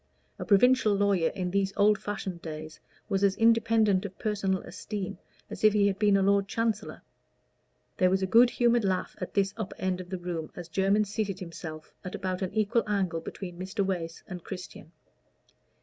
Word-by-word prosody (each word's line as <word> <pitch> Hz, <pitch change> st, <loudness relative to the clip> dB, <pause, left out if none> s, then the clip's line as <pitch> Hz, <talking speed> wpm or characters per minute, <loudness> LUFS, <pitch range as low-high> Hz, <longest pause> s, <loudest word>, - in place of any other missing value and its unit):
A -, -, -4 dB
provincial 215 Hz, 0 st, +4 dB
lawyer 200 Hz, -4 st, +2 dB
in 180 Hz, -1 st, -2 dB
those 195 Hz, 0 st, 0 dB
old 210 Hz, 0 st, +4 dB
fashioned 195 Hz, -4 st, -5 dB
days 155 Hz, -1 st, -7 dB, 0.3 s
was 195 Hz, 0 st, 0 dB
as 195 Hz, -1 st, +3 dB
independent 225 Hz, -3 st, +3 dB
of 200 Hz, -2 st, -7 dB
personal 195 Hz, -3 st, -1 dB
esteem 200 Hz, -4 st, -6 dB, 0.3 s
as -, -, -9 dB
if 215 Hz, -1 st, +6 dB
he 205 Hz, -1 st, +3 dB
had 195 Hz, -1 st, 0 dB
been 205 Hz, -2 st, +4 dB
a 195 Hz, -, +2 dB
Lord 200 Hz, 0 st, +3 dB
Chancellor. 225 Hz, +1 st, -2 dB, 0.9 s
There 185 Hz, -, +4 dB
was 190 Hz, +1 st, +1 dB
a -, -, +3 dB
good 235 Hz, +6 st, +6 dB
humored 240 Hz, -1 st, +2 dB
laugh 190 Hz, -2 st, -1 dB
at 180 Hz, -, -5 dB
this 195 Hz, -1 st, +2 dB
upper 215 Hz, -4 st, -5 dB
end 185 Hz, -1 st, -1 dB
of 180 Hz, -, -11 dB
the 185 Hz, -, -3 dB
room 175 Hz, -3 st, -4 dB
as 175 Hz, -1 st, -8 dB
Jermyn 195 Hz, +5 st, +2 dB
seated 205 Hz, -2 st, -3 dB
himself 160 Hz, -3 st, -8 dB
at 185 Hz, -, -5 dB
about 185 Hz, -1 st, -3 dB
an 185 Hz, -, -2 dB
equal 215 Hz, +2 st, +2 dB
angle 185 Hz, -5 st, 0 dB
between 175 Hz, 0 st, -8 dB
Mr. 195 Hz, +2 st, -2 dB
Wace 170 Hz, -4 st, -3 dB
and 180 Hz, -3 st, -7 dB
Christian. 180 Hz, -4 st, -9 dB
195 Hz, 185 wpm, -28 LUFS, 180-210 Hz, 0.9 s, if